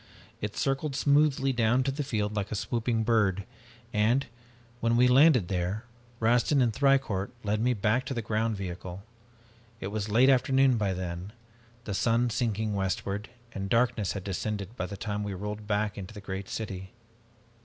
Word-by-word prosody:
It 105 0 -4
circled 135 +1 -1
smoothly 140 -1 +3
down 120 +2 +2
to 135 - 0
the 145 +3 -3
field 105 -6 -2
like 100 -1 -2
a - - -1
swooping 115 +1 -1
bird, 105 -4 +2 0.5
and, 115 +6 +2 0.5
when 115 0 +2
we 125 +1 +6
landed 130 - +6
there, 95 +5 -2 0.3
Rastin 120 +5 +3
and 120 -3 +3
Thicourt 135 -8 +2
led 105 +1 0
me 125 +1 +2
back 115 +5 +1
to 135 - -3
the 115 - -2
ground 110 0 0
vehicle. 90 0 -6 0.8
It 95 - -4
was 105 0 -3
late 120 +5 +5
afternoon 135 0 +4
by 100 -3 0
then, 90 +2 -5 0.5
the 105 - -4
sun 115 +4 +2
sinking 110 -2 -1
westward, 100 +1 -2 0.2
and 100 0 -4
darkness 115 -5 +2
had 100 - -5
descended 100 +2 -3
by 90 - -3
the 100 - -7
time 105 0 -3
we 100 -2 -4
rolled 105 +2 -5
back 105 -1 0
into 100 +3 -8
the - - -7
great 95 0 -5
city. 95 -2 -5
110 Hz, 170 wpm, -28 LUFS, 100-125 Hz, 0.8 s, we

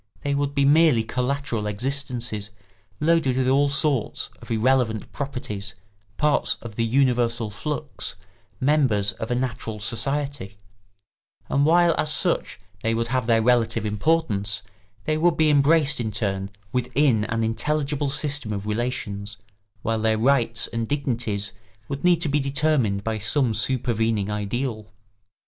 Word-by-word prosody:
They 145 - 0
would 140 0 -1
be 140 -1 +3
merely 145 -5 +5
collateral 125 -2 -2
existences, 120 -2 -2 0.5
loaded 155 -5 +2
with 130 -1 +1
all 140 +2 +3
sorts 140 -4 0
of - - -12
irrelevant 115 -1 +1
properties, 110 -7 -5 0.4
parts 150 -1 +1
of 115 -3 -8
the 115 - 0
universal 120 -2 +1
flux, 150 +5 -4 0.4
members 130 -8 +2
of 110 - -6
a 120 - +1
natural 120 -3 -3
society; 120 0 -2 0.9
and 140 +1 +2
while 170 +1 +5
as 155 - +1
such 175 - +1 0.2
they 115 0 0
would 115 0 -1
have 125 -2 0
their 115 -1 +3
relative 120 -3 +2
importance, 105 -3 0 0.4
they 155 0 0
would 170 0 +3
be 155 -1 +4
embraced 145 0 +4
in 115 -2 -1
turn 100 -2 -2 0.2
within 125 -2 +1
an 115 +1 -1
intelligible 145 +5 -1
system 145 -4 0
of 100 -1 -4
relations, 105 -2 -3 0.5
while 115 -1 0
their 110 0 +2
rights 120 -1 +3
and 115 -1 -3
dignities 115 -8 -1 0.3
would 140 +2 -5
need 175 -2 +4
to 170 - +2
be 145 +1 +1
determined 135 -7 +1
by 110 0 -2
some 115 +3 +1
supervening 115 -3 0
ideal. 110 +2 -3
125 Hz, 140 wpm, -24 LUFS, 110-140 Hz, 0.9 s, merely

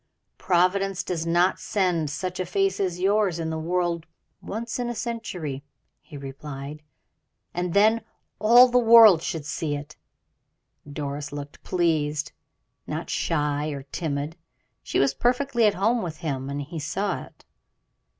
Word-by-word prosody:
"Providence 190 +2 +1
does 170 -2 -3
not 175 +3 +3
send 180 -7 0
such 180 +5 -4
a 185 - -1
face 195 +1 0
as 180 -3 -1
yours 195 -2 +2
in 160 -1 -3
the 160 - -3
world 170 0 -1 0.3
once 225 +3 -5
in 240 -1 -1
a 240 - -3
century," 190 - -4 0.4
he 145 - -12
replied, 140 +1 -8 0.7
"and 175 0 -2
then 220 +3 +5 0.4
all 240 +4 +8
the 250 0 +3
world 225 -7 +8
should 160 -3 -4
see 150 0 -2
it." 145 +2 -8 0.9
Doris 145 0 -4
looked 145 0 -8
pleased, 155 -4 0 0.6
not - - -4
shy 150 -2 0
or 140 -3 -5
timid; 150 -1 -3 0.5
she - - -3
was 135 0 +3
perfectly 245 - +2
at 205 - +2
home 225 +5 +2
with 165 -3 -5
him, 140 -4 -3
and 140 +1 -3
he 160 +3 -7
saw 195 +7 -2
it. - - -22
170 Hz, 145 wpm, -25 LUFS, 150-200 Hz, 0.9 s, all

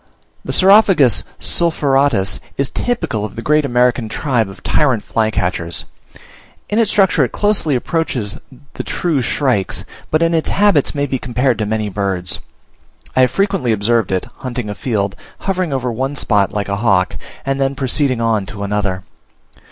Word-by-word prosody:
The - - -4
Saurophagus 190 - +5
sulphuratus 140 - +2 0.2
is 140 -1 0
typical 130 - -2
of 105 - -6
the 115 - -6
great 150 +3 +3
American 125 -2 +1
tribe 120 -5 0
of 95 - -13
tyrant 130 -8 +1
flycatchers. 90 -6 -1 0.9
In 210 - +2
its 225 -3 +3
structure 195 -3 +3
it - - -1
closely 205 -9 +2
approaches 125 - -2 0.3
the - - -4
true 160 -6 -1
shrikes, 125 -5 0 0.2
but 155 +2 +2
in 165 0 +2
its 160 -1 +1
habits 195 -9 +2
may 145 0 0
be 130 -2 -2
compared 125 -1 0
to 110 - -1
many 110 0 -1
birds. 95 -3 -2 0.8
I 130 - +4
have 130 - +5
frequently 195 - 0
observed 110 0 +1
it, 95 -1 0
hunting 125 -5 -4
a - - -3
field, 100 -3 -2 0.3
hovering 185 -4 -1
over 125 -2 -1
one 135 +5 -2
spot 105 -7 +1
like 105 -1 -2
a 100 0 -2
hawk, 100 -4 +2 0.3
and 135 0 -1
then 135 0 0
proceeding 130 -1 0
on 110 -4 0
to 100 +2 -6
another. 100 -2 -1
125 Hz, 160 wpm, -17 LUFS, 105-150 Hz, 0.9 s, Saurophagus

